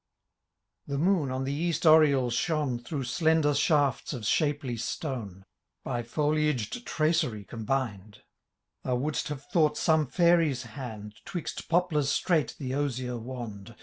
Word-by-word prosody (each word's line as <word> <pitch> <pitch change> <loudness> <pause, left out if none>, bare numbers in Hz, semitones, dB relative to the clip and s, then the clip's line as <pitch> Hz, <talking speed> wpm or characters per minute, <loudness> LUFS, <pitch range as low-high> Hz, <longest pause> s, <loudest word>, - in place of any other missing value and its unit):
The 140 - -2
moon 165 -2 +2
on 130 +1 -2
the 135 +1 -2
east 165 +2 -1
oriel 145 -6 +5
shone' 140 -1 0
Through 135 +3 -4
slender 160 +2 +2
shafts 145 -3 +1
of 120 -5 -5
shapely 145 -1 0
stone. 110 - -5 0.4
By 120 - -2
foliaged 150 - -1
traceiy 155 - 0
combined; 110 -4 -3 0.6
Thou 125 - -1
wouldst 145 +5 -1
have 145 -2 -6
tiiought 155 -3 +3
some 155 -3 +2
fiuiy^ 165 -4 +3
hand 110 -6 -8
Twixt 175 -4 -6
poplars 160 -5 +2
straight 160 -2 +1
the 130 -2 -4
ozier 130 -3 -2
wand. 115 -3 -7
140 Hz, 130 wpm, -28 LUFS, 120-155 Hz, 0.6 s, oriel